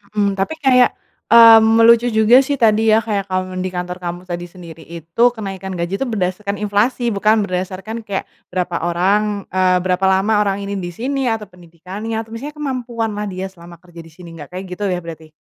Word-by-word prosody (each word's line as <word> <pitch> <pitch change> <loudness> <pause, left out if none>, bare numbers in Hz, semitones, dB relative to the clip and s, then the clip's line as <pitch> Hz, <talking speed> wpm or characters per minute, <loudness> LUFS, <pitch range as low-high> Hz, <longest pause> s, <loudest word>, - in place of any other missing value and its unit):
Mhm, 205 -1 +2
tapi 195 +12 -1
kayak, 250 -2 +4 0.3
mmm, 225 -1 +7
lucu 235 +1 +5
juga 220 +3 +5
sih 275 +1 0
tadi 225 -3 +2
ya 220 +1 +3
kayak 205 -3 -2
kamu 185 -1 -3
di 185 - -2
kantor 180 0 -4
kamu 175 0 -5
tadi 175 0 -4
sendiri 170 -2 -12
itu 170 +6 -3
kenaikan 195 -3 -6
gaji 175 +3 -3
tuh 270 - -2
berdasarkan 200 -2 -2
inflasi 220 +4 0
bukan 215 +2 +2
berdasarkan 190 +4 -4
kayak 195 -1 -2 0.3
berapa 180 -1 -2
orang, 200 +4 0
eee, 185 0 +2
berapa 185 +1 0
lama 190 +3 +2
orang 200 -2 0
ini 200 0 -4
disini 250 +10 -3
atau 225 -2 -1
pendidikannya 180 +5 -8
atau 225 - -13
misalnya 280 +7 -7
kemampuan 245 -6 -3
lah 210 0 -4
dia 190 0 -5
selama 170 -1 -14
kerja 175 -2 -15
disini 165 +2 -13
nggak 145 - -10
kayak 185 +1 -5
gitu 195 +3 -5
ya 180 -1 -1
berarti? 160 -1 -9
195 Hz, 185 wpm, -18 LUFS, 180-225 Hz, 0.3 s, mmm